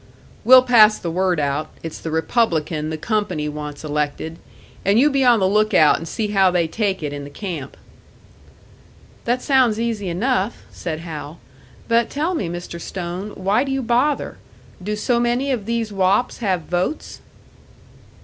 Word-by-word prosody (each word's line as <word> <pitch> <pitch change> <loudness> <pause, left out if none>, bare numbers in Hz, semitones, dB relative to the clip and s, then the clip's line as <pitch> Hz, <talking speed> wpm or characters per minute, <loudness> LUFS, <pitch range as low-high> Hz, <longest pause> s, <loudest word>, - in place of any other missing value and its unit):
"We'll 255 +3 +8
pass 220 -4 +6
the 170 - -4
word 180 -1 +1
out, 145 +1 -1
it's 165 - -6
the 165 - -5
Republican 160 -3 0
the 160 - -4
company 205 -5 -1
wants 150 0 -6
elected; 150 +2 -3 0.4
and 200 +3 +3
you 295 +3 +4
be 275 -1 +2
on 240 -3 +5
the 190 - +2
lookout 205 -6 +4
and 165 - -7
see 215 +3 -3
how 195 -2 +4
they 175 -2 +1
take 195 -1 -2
it 145 -1 -3
in 145 0 -6
the 140 - -8
camp." 160 -5 -6 1.5
"That 245 +2 0
sounds 255 -6 +3
easy 225 -5 -2
enough," 215 +4 -1
said 160 -2 -5
Hal. 155 -1 -7 0.5
"But 230 0 +2
tell 315 +6 -1
me, 200 - -2
Mr. 175 0 -7
Stone, 185 +4 -5
why 200 +6 +1
do 275 - -4
you 270 -1 -1
bother? 250 +5 0 0.4
Do 210 +3 -3
so 235 +3 0
many 240 +3 0
of 225 -6 -3
these 230 -2 -2
wops 195 +5 +1
have 190 -6 0
votes?" 180 - -3
195 Hz, 165 wpm, -21 LUFS, 165-235 Hz, 1.5 s, We'll